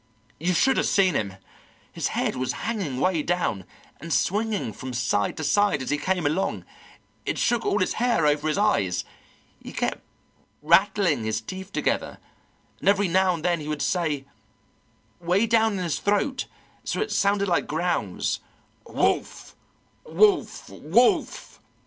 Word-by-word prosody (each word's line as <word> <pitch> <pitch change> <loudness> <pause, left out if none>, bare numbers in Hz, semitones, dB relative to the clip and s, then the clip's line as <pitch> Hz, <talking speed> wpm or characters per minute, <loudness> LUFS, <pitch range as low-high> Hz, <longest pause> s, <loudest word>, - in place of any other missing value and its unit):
You 175 +4 0
should 265 +10 +3
have - - +2
seen 190 -3 +3
him; 100 -3 -2 0.6
his - - -2
head - - -1
was 130 0 -2
hanging 195 - -2
way 180 0 +1
down, 160 - -1 0.3
and 165 +3 -8
swinging 210 - 0
from 130 +3 -7
side 115 -4 0
to 155 - -4
side 205 0 +2
as - - -4
he 145 - 0
came 185 -2 -1
along; 175 +7 -1 0.6
it - - -2
shook 240 -1 +1
all - - +2
his 185 - 0
hair 235 -10 +2
over 150 +1 +2
his 155 - 0
eyes. 95 - +1 0.6
He - - -9
kept - - -2 0.6
rattling 170 - +3
his 110 0 -1
teeth 190 - -8
together, - - -1 0.6
and - - +2
every 200 -2 +3
now 185 +1 +3
and 160 - -7
then 175 -1 +2
he 150 - -7
would 150 -1 -2
say, 155 -6 -1 0.9
way 180 +5 +2
down 225 -1 +3
in 190 -2 -2
his 170 -4 -1
throat 205 +6 0 0.4
so - - -3
it 430 - -2
sounded 200 0 +2
like 175 - +1
growls, 175 +3 -1 0.5
'Wolf - - -1 0.5
wolf 430 -5 +2
wolf.' 240 - +1
180 Hz, 155 wpm, -25 LUFS, 150-205 Hz, 0.9 s, should